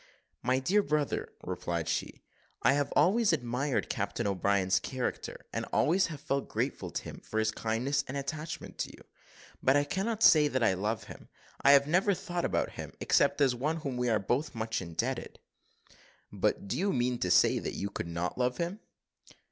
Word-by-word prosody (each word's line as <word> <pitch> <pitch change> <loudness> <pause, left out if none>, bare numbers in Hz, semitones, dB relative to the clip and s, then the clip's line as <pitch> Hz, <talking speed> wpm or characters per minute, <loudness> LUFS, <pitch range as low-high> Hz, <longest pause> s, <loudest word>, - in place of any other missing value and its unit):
"My 130 +1 +2
dear 185 +11 +3
brother," 150 -6 -1
replied 85 -2 -3
she, 85 +1 -3 0.4
"I - - +5
have 145 0 0
always 200 +8 +4
admired 130 0 -1
Captain 105 +3 -2
O'Brien's 100 -1 +2
character, 130 -2 -4
and - - -2
always 185 +5 +3
have 155 -4 -7
felt 140 0 -2
grateful - - -2
to - - -4
him - - -8
for 110 - -6
his 110 0 +2
kindness 115 +6 -1
and 135 - -4
attachment 155 +3 -5
to - - -2
you; - - -14 0.6
but 135 +2 +4
I 145 - +3
cannot 210 +8 -2
say 150 -2 +7
that 130 -4 0
I 110 - +4
love 105 +3 -2
him - - -12 0.3
I 140 - +7
have 140 0 +6
never 185 +6 +2
thought 175 0 -3
about - - 0
him, - - -8
except - - +2
as 135 -3 +4
one 145 +6 -1
to 165 - -6
whom 135 -4 -3
we 125 0 0
are 110 - +3
both 135 +9 -1
much 110 -1 -2
indebted." 85 -3 -3 0.9
"But - - 0
do - - -2
you 200 +2 +1
mean 125 -1 0
to 90 - 0
say 90 - +5
that - - -4
you 100 +1 -3
could 90 - -4
not 85 +6 -3
love 125 0 +1
him?" 175 +5 -3
130 Hz, 190 wpm, -30 LUFS, 110-150 Hz, 0.9 s, say